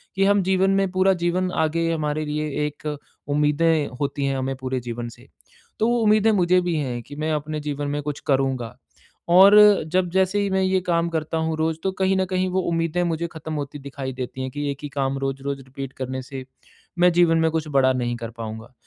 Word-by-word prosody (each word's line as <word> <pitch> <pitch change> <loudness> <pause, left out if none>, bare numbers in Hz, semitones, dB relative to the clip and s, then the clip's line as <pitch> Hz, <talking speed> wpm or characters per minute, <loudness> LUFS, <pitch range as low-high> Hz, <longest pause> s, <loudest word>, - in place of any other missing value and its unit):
कि 195 - +2
हम 200 0 +4
जीवन 190 +1 +2
में 195 -1 +1
पूरा 190 +1 +3
जीवन 180 +1 0
आगे 165 +1 0
हमारे 155 -1 -1
लिए 150 +1 -2 0.2
एक 150 +1 -7 0.4
उम्मीदें 150 +2 +2
होती 140 0 -1
हैं 135 -1 0
हमें 135 +1 -2
पूरे 130 0 -3
जीवन 120 0 -4
से। 120 +2 -19 0.5
तो 220 - +2
उम्मीदें 215 0 +4
मुझे 180 -2 +3
भी 175 -1 -1
हैं 130 -6 -2
कि 145 - -11
मैं 155 +1 -2
अपने 150 +1 -3
जीवन 145 -1 -3
में 145 +1 -2
कुछ 145 0 -4
करूँगा। 130 -4 0 0.6
और 195 +3 +8 0.4
जब 185 -1 +2
जैसे 190 +2 +2
ही 200 -1 0
मैं 190 0 +1
ये 190 0 +2
काम 170 0 +2
करता 160 -1 -2
हूँ 160 0 -1
रोज़ 160 0 0
तो 190 - +1
कहीं 190 0 +2
न 190 - +1
कहीं 185 0 -1
वो 185 +1 0
उम्मीदें 165 +1 0
मुझे 170 -1 -1
ख़त्म 160 0 -6
होती 145 -1 -5
दिखाई 135 -1 -6
देती 130 +1 -6
हैं 130 0 -4
कि 145 +1 -3
एक 140 - -6
ही 145 - -4
काम 135 -1 -1
रोज़-रोज़ 135 +1 -3
रिपीट 135 +1 -8
करने 130 0 -3
से 130 0 -8 0.5
मैं 180 0 +6
जीवन 170 -1 +4
में 160 0 +3
कुछ 160 -1 -2
बड़ा 130 -1 +5
नहीं 120 -1 -1
कर 115 -1 -6
पाऊँगा। 110 +2 -7
155 Hz, 215 wpm, -23 LUFS, 135-175 Hz, 0.6 s, और